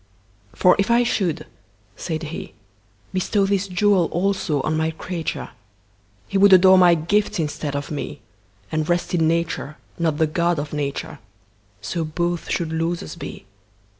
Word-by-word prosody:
For 180 Hz, -, +5 dB
if 200 Hz, -, +1 dB
I 235 Hz, +1 st, +4 dB
should 190 Hz, -9 st, -1 dB, 0.5 s
(said 160 Hz, -2 st, -4 dB
He)Bestow 105 Hz, -, -4 dB
this 200 Hz, 0 st, 0 dB
jewel 190 Hz, -1 st, +3 dB
also 180 Hz, -4 st, 0 dB
on 155 Hz, -, 0 dB
My 160 Hz, 0 st, +1 dB
creature, 165 Hz, 0 st, -5 dB, 0.8 s
He 195 Hz, -, 0 dB
would 200 Hz, 0 st, +7 dB
adore 185 Hz, 0 st, +7 dB
My 175 Hz, -2 st, +6 dB
gifts 195 Hz, +6 st, 0 dB
instead 150 Hz, -2 st, -3 dB
of 145 Hz, +2 st, -4 dB
Me, 145 Hz, 0 st, -5 dB, 0.5 s
And 155 Hz, 0 st, -1 dB
rest 175 Hz, +1 st, 0 dB
in 165 Hz, -2 st, +3 dB
Nature, 165 Hz, -2 st, -1 dB, 0.2 s
not 160 Hz, -3 st, +1 dB
the 160 Hz, -, +3 dB
God 170 Hz, +2 st, 0 dB
of 145 Hz, +1 st, -4 dB
Nature:So 105 Hz, -, -6 dB
both 170 Hz, +2 st, -2 dB
should 165 Hz, -2 st, -1 dB
losers 165 Hz, +2 st, -2 dB
be. 170 Hz, -, -8 dB
165 Hz, 140 wpm, -22 LUFS, 150-180 Hz, 0.8 s, would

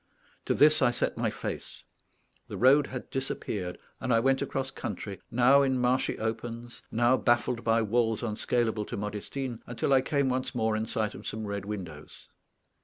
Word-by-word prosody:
To -, -, +1 dB
this 155 Hz, +1 st, +5 dB
I 130 Hz, -, +5 dB
set 120 Hz, -, -1 dB
my -, -, 0 dB
face; -, -, -6 dB, 0.6 s
the -, -, -6 dB
road 140 Hz, +3 st, +5 dB
had 125 Hz, -1 st, -7 dB
disappeared, 105 Hz, -8 st, -3 dB, 0.2 s
and 130 Hz, -, -2 dB
I 115 Hz, -, +5 dB
went 135 Hz, +3 st, +2 dB
across 135 Hz, 0 st, -2 dB
country, 100 Hz, 0 st, -6 dB
now 125 Hz, +4 st, +5 dB
in 135 Hz, -2 st, +2 dB
marshy 125 Hz, +1 st, +1 dB
opens, 115 Hz, +1 st, -5 dB
now 120 Hz, +3 st, +3 dB
baffled 120 Hz, -1 st, +1 dB
by 115 Hz, 0 st, +3 dB
walls 115 Hz, +1 st, +1 dB
unscalable 110 Hz, -1 st, 0 dB
to -, -, -5 dB
Modestine, 110 Hz, +5 st, -4 dB
until 120 Hz, +3 st, 0 dB
I 130 Hz, -, +6 dB
came 140 Hz, 0 st, 0 dB
once 130 Hz, 0 st, -1 dB
more 110 Hz, -2 st, +1 dB
in 110 Hz, +1 st, -2 dB
sight 110 Hz, -2 st, -1 dB
of -, -, -9 dB
some 110 Hz, 0 st, -4 dB
red 100 Hz, -1 st, -4 dB
windows. 90 Hz, -8 st, -8 dB
120 Hz, 175 wpm, -29 LUFS, 110-130 Hz, 0.6 s, I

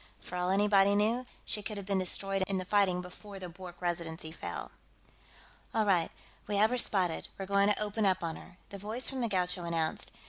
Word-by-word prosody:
For 180 Hz, -, -8 dB
all 180 Hz, 0 st, 0 dB
anybody 200 Hz, 0 st, +4 dB
knew, 230 Hz, +5 st, +2 dB, 0.2 s
she 210 Hz, -, 0 dB
could 210 Hz, 0 st, -5 dB
have 200 Hz, -, -5 dB
been 195 Hz, -1 st, +1 dB
destroyed 195 Hz, +1 st, 0 dB
in 195 Hz, -, 0 dB
the 185 Hz, -, -3 dB
fighting 185 Hz, -2 st, +3 dB
before 195 Hz, +3 st, -10 dB
the 185 Hz, -2 st, -6 dB
Bwork 175 Hz, 0 st, -10 dB
Residency 170 Hz, -2 st, -3 dB
fell. -, -, -6 dB, 1.0 s
"All 220 Hz, -1 st, +3 dB
right, 180 Hz, -5 st, +3 dB, 0.4 s
we 205 Hz, -1 st, 0 dB
have 215 Hz, +3 st, +5 dB
her 250 Hz, -, +1 dB
spotted; 185 Hz, -7 st, +1 dB
we're 195 Hz, -, -4 dB
going 200 Hz, +1 st, +3 dB
to -, -, +1 dB
open 210 Hz, +1 st, -1 dB
up 185 Hz, -1 st, +2 dB
on 165 Hz, -1 st, -2 dB
her," 180 Hz, -, -13 dB
the 200 Hz, -, -8 dB
voice 220 Hz, +7 st, +1 dB
from 265 Hz, -1 st, -3 dB
the 235 Hz, -, 0 dB
Gaucho 180 Hz, -2 st, +2 dB
announced. 165 Hz, -2 st, -1 dB
195 Hz, 210 wpm, -32 LUFS, 180-205 Hz, 1.0 s, have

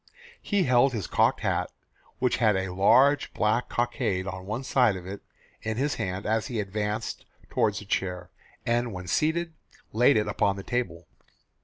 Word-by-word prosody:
He 205 Hz, -3 st, +1 dB
held 130 Hz, -1 st, +4 dB
his 105 Hz, -7 st, -3 dB
cocked -, -, +2 dB
hat, -, -, 0 dB, 0.5 s
which 125 Hz, -1 st, +1 dB
had 110 Hz, -5 st, +3 dB
a 95 Hz, -1 st, -2 dB
large 135 Hz, +9 st, +4 dB
black 110 Hz, +3 st, +1 dB
cockade 120 Hz, -6 st, -1 dB
on 95 Hz, -1 st, -6 dB
one 110 Hz, +6 st, -3 dB
side 125 Hz, -6 st, +3 dB
of 90 Hz, -1 st, -8 dB
it, 100 Hz, +2 st, -7 dB, 0.4 s
in 110 Hz, 0 st, -3 dB
his 140 Hz, +2 st, 0 dB
hand, 95 Hz, +1 st, -3 dB
as 110 Hz, +1 st, 0 dB
he 120 Hz, -3 st, -3 dB
advanced 105 Hz, +1 st, -3 dB, 0.3 s
toward 105 Hz, -2 st, +2 dB
the 105 Hz, -, -6 dB
chair, 90 Hz, -2 st, -2 dB, 0.3 s
and 120 Hz, -1 st, 0 dB
when 90 Hz, -1 st, -6 dB
seated, 165 Hz, -, 0 dB, 0.4 s
laid 120 Hz, +3 st, +5 dB
it 105 Hz, -1 st, -2 dB
on 100 Hz, -2 st, +3 dB
the 100 Hz, -, -7 dB
table. 115 Hz, -9 st, -3 dB
110 Hz, 170 wpm, -27 LUFS, 95-125 Hz, 0.5 s, laid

